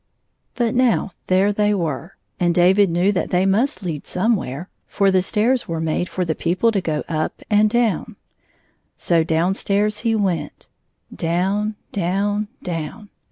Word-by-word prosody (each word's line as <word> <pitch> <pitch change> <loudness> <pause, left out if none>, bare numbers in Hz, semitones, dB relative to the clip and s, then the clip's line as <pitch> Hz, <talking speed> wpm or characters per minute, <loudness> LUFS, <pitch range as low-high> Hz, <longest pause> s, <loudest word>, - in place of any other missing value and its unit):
73 240 - +1 0.2
But - - +4
now, 200 - -4 0.2
there 190 +3 +3
they 210 0 +2
were, 165 -1 -3 0.2
and 175 -1 +2
David 190 +3 +5
knew 175 +4 +2
that 190 - -1
they 180 +1 +2
must 220 +6 +1
lead 160 -5 -4
somewhere, 180 - -1 0.2
for 200 -1 +2
the 185 -1 +3
stairs 230 +6 +1
were 165 -1 -3
made 160 +2 -1
for 185 - -2
the 160 - 0
people 180 +9 +1
to 200 -3 0
go 155 -4 -2
up 155 -1 -3
and 210 +1 +4
down. 230 -5 0 0.8
So 165 -2 +2
down 165 +3 +1
stairs 210 +2 0
he 230 -1 +1
went 190 -6 -2 0.3
— - - -50
down, 195 +6 0 0.2
down, 205 +3 -1 0.2
down. 175 +5 -5
190 Hz, 160 wpm, -21 LUFS, 170-210 Hz, 0.8 s, David